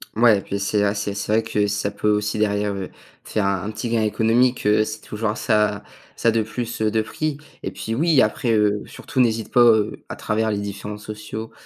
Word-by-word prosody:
Mouais 110 -3 +5
puis 100 - -4
c'est 100 +1 +1
a 100 0 +2
c'est 100 0 -2
c'est 100 +1 -3
vrai 110 +1 +3
que 105 -2 0
ça 100 0 -1
peut 105 +1 -1
aussi 105 0 0
derrière, 105 -1 +1
heu, 95 -2 -5 0.3
te - - -14
faire 105 -2 0
un 100 0 -1
petit 110 +2 -4
gain 115 -1 +1
économique, 115 +4 +2
heu, 105 +1 +4
c'est 110 0 -6
toujours 105 0 -3
ça 105 -2 +1 0.3
ça 115 - +2
de 115 0 +2
plus, 115 +1 -4
heu, 110 - +3
de 110 0 +2
pris 150 +6 -3 0.2
et - - -3
puis 115 - -5
oui 155 +3 +4
après, 125 -2 +1
heu, 105 -1 +2
surtout - - -5
n'hésite 115 -3 +1
pas, 125 - +5
heu, 110 -3 +4
à - - -5
travers 110 +1 -1
les 105 - 0
différents 100 +1 -5
sociaux 105 +1 -7
105 Hz, 220 wpm, -22 LUFS, 105-115 Hz, 0.3 s, Mouais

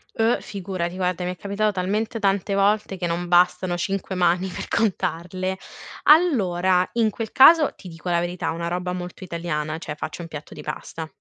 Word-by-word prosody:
Uh, 225 +1 +2
figurati, 185 -3 -4
guarda 180 -1 -1
mi 180 - -1
è - - -34
capitato 205 +1 -1
talmente 210 +5 -1
tante 195 -1 +1
volte 200 0 +1
che 180 - -3
non 175 +1 -2
bastano 180 0 +3
5 195 +2 -3
mani 180 +1 +2
per 180 - -6
contarle. 185 -3 -1 0.5
Allora, 190 - +4
in 225 -2 +2
quel 225 0 -5
caso 310 +2 +7
ti 185 - -12
dico 165 +1 -7
la 170 -1 +2
verità 175 +1 -2
una 170 +1 -3
roba 180 +1 -2
molto 180 +1 -7
italiana, 160 -3 -3
cioè 155 -2 -6
faccio 155 +3 -6
un - - -7
piatto 155 -2 -9
di - - -9
pasta 160 +1 -6
180 Hz, 180 wpm, -23 LUFS, 175-200 Hz, 0.5 s, caso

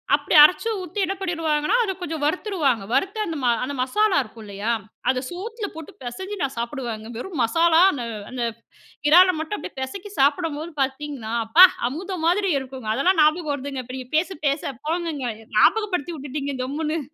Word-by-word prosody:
அப்படி - - -1
அரைச்சு 365 +8 +4
ஊத்தி 365 +3 -6
என்ன 390 +2 -3
பண்ணிடுவாங்கன்னா, 330 0 0
அத 390 - -1
கொஞ்சம் 315 -3 -4
வறுத்துருவாங்க. 305 - 0
வறுத்து 400 +3 0
அந்த 330 - -4
ம - - +1 0.2
அந்த 285 +2 -3
மசாலா 415 +9 +2
இருக்கும். 220 0 -13
இல்லையா? 205 +3 -3 0.4
அத 255 -1 +2
சோத்துல 415 +4 -5
போட்டு 320 -2 -9
பெசஞ்சி 375 +13 -5
நான் 275 -2 -2
சாப்பிடுவங்க. 235 -3 -4
வெறும் 325 +2 -6
மசாலா 330 +7 +4
அந்த 250 -4 -4 0.3
அந்த 250 -2 -3 0.7
இறால 365 +4 +8
மட்டும் 320 +6 -3
அப்படியே 345 - -9
பெசைக்கி 390 +10 -6
சாப்பிடும்போது 310 +3 +1
பார்த்தீங்கன்னா, 265 -4 -3
அப்பா 340 +11 +9 0.2
அமுதம் 360 +3 -5
மாதிரி 380 +1 +2
இருக்குங்க! 260 -4 -7
அதெல்லாம் 360 +6 +2
ஞாபகம் 310 0 +2
வருதுங்க 275 -2 -5
இப்போ. 255 +2 -8
நீங்க 255 -1 -8
பேச 355 +4 +1 0.2
பேச 280 -1 -1
போங்கங்க. 325 -5 -2 0.3
ஞாபகப்படுத்தி 360 - +2
விட்டுட்டீங்க 280 0 -4
கம்முனு. 305 +4 -2
305 Hz, 160 wpm, -23 LUFS, 265-360 Hz, 0.7 s, அப்பா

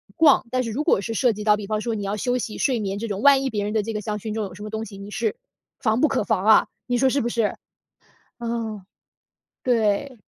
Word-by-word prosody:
逛， 290 -3 +5
但 255 0 +1
是 230 - -4
如 275 +7 -1
果 195 - +3
是 225 - -4
涉 245 0 +3
及 210 0 -6
到， 210 -1 +4
比 210 - -6
方 215 0 -1
说 230 -1 -2
你 205 - -4
要 200 +1 -2
休 250 +3 0
息 220 -3 -4
睡 255 -4 +1
眠 200 -2 -2
这 230 - -3
种， 205 -2 -3
万 280 -1 +6
一 270 - 0
别 210 -4 -2
人 210 +1 -2
的 220 - +2
这 225 +2 -4
个 210 - -2
香 210 0 -3
薰 215 +1 -5
中 220 0 -2
有 190 - -8
什 200 - -12
么 215 - -6
东 220 +1 -4
西， 200 -2 -10
你 200 +1 -8
是 220 - -1 0.4
防 220 -2 +1
不 310 - +5
可 270 -5 0
防 205 -2 0
啊。 220 - +6 0.2
你 245 -1 0
说 265 +2 +3
是 280 - +1
不 235 - -1
是？ 230 -3 0 0.8
嗯， 230 -4 -4 0.8
对。 235 +2 +1
220 Hz, 285 characters per minute, -23 LUFS, 210-245 Hz, 0.8 s, 万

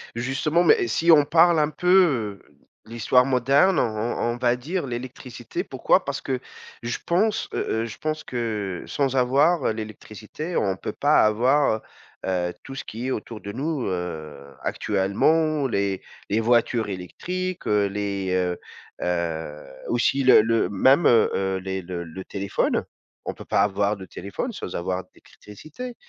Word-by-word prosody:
Justement 135 +8 +1
mais 160 - +4
si 165 +9 +3
on 150 -3 +7
parle 165 +2 +5
un 150 0 +2
peu, 150 - +2
heu, - - -26 0.3
de 110 - -16
l'histoire 125 +2 +3
moderne, 135 +8 +3
on - - +4
on 115 +1 -2
on - - -8
va 120 0 +2
dire 150 +6 -3
l'électricité. 120 -1 -6
Pourquoi - - +1
parce - - -3
que 130 -1 -2 0.4
je 120 0 -3
pense, 210 +5 +1
heu 110 - -1
heu, - - -2
je 115 -1 -8
pense 155 0 -3
que 105 -6 -3
sans 135 -2 -1
avoir, 140 +6 +3
heu, - - +2
l'électricité 110 - -7
on 95 -2 +1
peut - - -5
pas - - +4
avoir, 120 +2 +2 0.4
heu - - -4
heu, 90 -1 -1
tout 135 - -9
ce - - -5
qui 115 +4 -5
est - - -1
autour 110 -1 -5
de 100 - -6
nous, 140 +3 -2
heu, 90 -5 -4 0.2
actuellement. 140 +10 +1
Les 100 -5 -1 0.3
les 105 - +2
voitures 115 0 +2
électriques, 180 - -5
heu, 105 -1 +3
les, 100 -1 -3
heu 90 -1 0 0.4
heu, 80 -4 -3 0.2
aussi 135 +3 +2
le 130 -4 +8
le 115 +1 +1
même, 130 - +4
heu 115 -2 +5
heu, 95 0 0
les 95 0 -4
le 85 -1 -5
le 85 +3 -8
téléphone. 100 0 -1 0.4
On - - -2
peut - - -11
pas - - +1
avoir 100 +1 0
de 95 - -9
téléphone 100 - -5
sans 90 - -6
avoir 90 +1 -2
d'électricité, 155 - -11
115 Hz, 170 wpm, -24 LUFS, 100-145 Hz, 0.4 s, le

